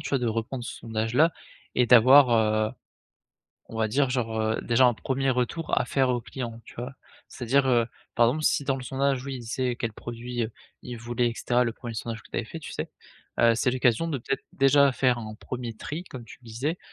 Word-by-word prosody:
tu - - -6
vois, 140 - +2
de 125 - -1
reprendre 115 +3 -3
ce - - -6
sondage-là 115 +8 +1 0.4
et 125 - +3
d'avoir, 125 +3 +8
heu, 110 -1 +2 1.0
on 115 - -7
va 110 -1 +1
dire 135 +3 +1
genre, 115 -3 -1
heu, 110 0 0
déjà 120 +2 +3
un 120 - +3
1er 135 +3 -1
retour 125 +6 -1
à - - 0
faire 130 +1 +1
aux 120 -1 0
clients 115 -1 -6
tu - - -14
vois? 125 +3 -5 0.4
C'est-à-dire, 130 +3 +1
heu, 120 -2 +3 0.3
par 120 - +5
exemple, 150 +6 -1
si 145 - +2
dans 135 -1 0
le 130 - -7
sondage, 135 +1 0
oui, 135 - -4
il 125 - -8
sait 125 +2 -2
c'est - - -6
quel 115 -2 -3
produit, 120 +2 -4
heu, 110 - -5 0.3
il 125 -1 -7
voulait 120 +1 -1
et 115 - -4
cetera, 125 +1 +1
le 115 - -1
1er 120 0 -7
sondage 115 0 -5
que - - -19
tu - - -6
avais - - -3
fait, - - -7
tu - - -9
sais? - - -4 0.5
Heu, 115 0 +5
c'est 120 +2 +1
l'occasion 125 +4 +2
de 155 - -1
peut-être 135 +2 -3
déjà 140 +1 +5
faire 125 -1 +2
un 110 -2 -7
1er 120 +1 -6
tri, 155 +9 -6
comme 130 -9 -9
tu - - -13
le 120 - -19
disais, 135 +10 -3
125 Hz, 235 wpm, -26 LUFS, 115-135 Hz, 1.0 s, d'avoir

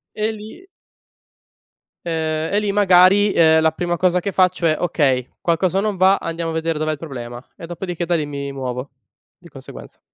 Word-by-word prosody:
E 215 +1 -1
lì 220 - -11 1.4
ehm 160 0 -2
e 205 - +3
lì 210 -1 -1
magari, 195 0 +5
ehm, 160 -1 +4
la 160 0 +3
prima 175 +1 -3
cosa 180 +1 +2
che 200 - -3
faccio 185 -2 +1
è: 155 -1 +3
"Okay, 135 -7 0
qualcosa 175 +2 0
non 210 -2 -2
va, 190 +2 +4
andiamo 165 0 -4
a - - -5
vedere 160 -1 -2
dov'è 155 0 -1
il 155 - -4
problema", 120 -5 -8
e 170 - -9
dopodiché 175 0 -5
da 175 - 0
lì 155 -3 -1
mi 140 -1 -6
muovo 130 0 -5 0.5
di - - -17
conseguenza. - - -13
170 Hz, 185 wpm, -20 LUFS, 155-185 Hz, 1.4 s, magari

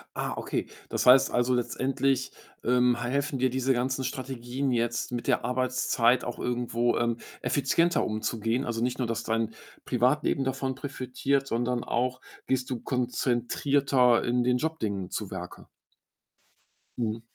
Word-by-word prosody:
Ah, - - -2
okay. - - -2 0.2
Das - - -1
heißt 130 +2 +7
also, 120 +1 +2
letztendlich, 130 +2 0 0.3
ähm, 125 0 +3
ha 120 - -2
helfen 140 +1 -1
dir 130 +1 +3
diese 130 +1 +1
ganzen 130 +2 -1
Strategien 130 +1 -3
jetzt, 120 0 0
mit 120 -1 -4
der 125 - +2
Arbeitszeit 125 -1 +2
auch 120 - -5
irgendwo, 120 -1 0
ähm, 120 -1 +1 0.2
effizienter 140 +7 +2
umzugehen? 115 +2 -1
Also 115 -1 -2
nicht 125 +1 0
nur, 125 - -1
dass 115 0 -2
dein 115 0 -1 0.3
Privatleben 130 +3 +2
davon 135 0 -1
profitiert, 135 0 -1
sondern 120 0 -1
auch 125 +2 -1 0.3
gehst 130 0 0
du 125 - -2
konzentrierter 125 +1 +2
in 120 0 +1
den 125 0 +2
Job-Dingen 110 - -2
zu 105 -3 -3
Werke? 90 -1 -8 1.3
Mhm. 115 -1 -2
125 Hz, 140 wpm, -28 LUFS, 120-130 Hz, 1.3 s, heißt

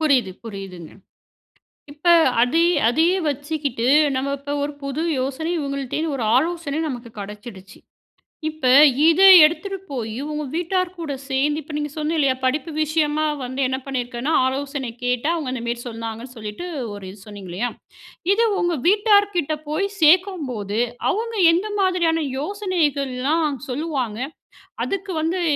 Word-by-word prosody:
புரியிது, 260 -11 +2
புரியிதுங்க. 195 -6 -8 1.0
இப்ப 300 +4 -6 0.3
அதே 320 +8 +3 0.2
அதே 320 +8 +3 0.2
வச்சுக்கிட்டு, 285 -4 -2 0.3
நம்ம 275 +2 -1
இப்ப 285 +1 -6
ஒரு 290 0 -3
புது 275 +2 -3 0.2
யோசனை 280 +5 -3
இவங்கள்ட 275 -2 -4
இருந்து 315 -1 -1
ஒரு 235 - -2
ஆலோசனை 325 0 0
நமக்கு 240 -3 -6
கடச்சிடுச்சு. 200 -1 -10 0.7
இப்ப 310 -5 -1 0.4
இத 340 +4 +3 0.2
எடுத்துட்டு 390 +5 -1
போய், 225 -5 -4 0.2
உங்க 300 0 -3
வீட்டார் 360 +2 0
கூட 320 -4 -5 0.2
சேர்ந்து 290 +3 0
இப்ப 300 +1 -11
நீங்க 295 -1 -3
சொன்னீங்க 310 +1 -1
இல்லயா, 270 -2 +3
படிப்பு 295 +5 -1
விஷயமா 310 0 0 0.2
வந்து 260 +2 -4
என்ன 260 0 -2
பண்ணிருக்கேன்னா, 255 +2 -3
ஆலோசனை 275 -1 -3
கேட்டா 250 +4 0
அவங்க 280 -6 -3
இந்த 250 - -4
மேரி 235 0 -2
சொன்னாங்கன்னு 230 +2 -7
சொல்லிட்டு, 215 +9 -6 0.3
ஒரு 205 -1 -9
இது 200 - -14
சொன்னீங்கலயா. 205 +2 -4 0.6
இது 460 +3 +3 0.2
உங்க 345 -2 0
வீட்டார் 410 +1 +5
கிட்ட 310 -2 0
போய் 320 +7 0
சேர்க்கும்போது, 300 - +2 0.3
அவங்க 460 +2 -2 0.2
எந்த 385 +6 0
மாதிரியான 340 -4 +1
யோசனைகள்லாம் 300 -5 -1
சொல்லுவாங்க. 255 -5 -3 0.7
அதுக்கு 395 0 -4
வந்து 345 +3 -1
285 Hz, 135 wpm, -22 LUFS, 250-330 Hz, 1.0 s, வீட்டார்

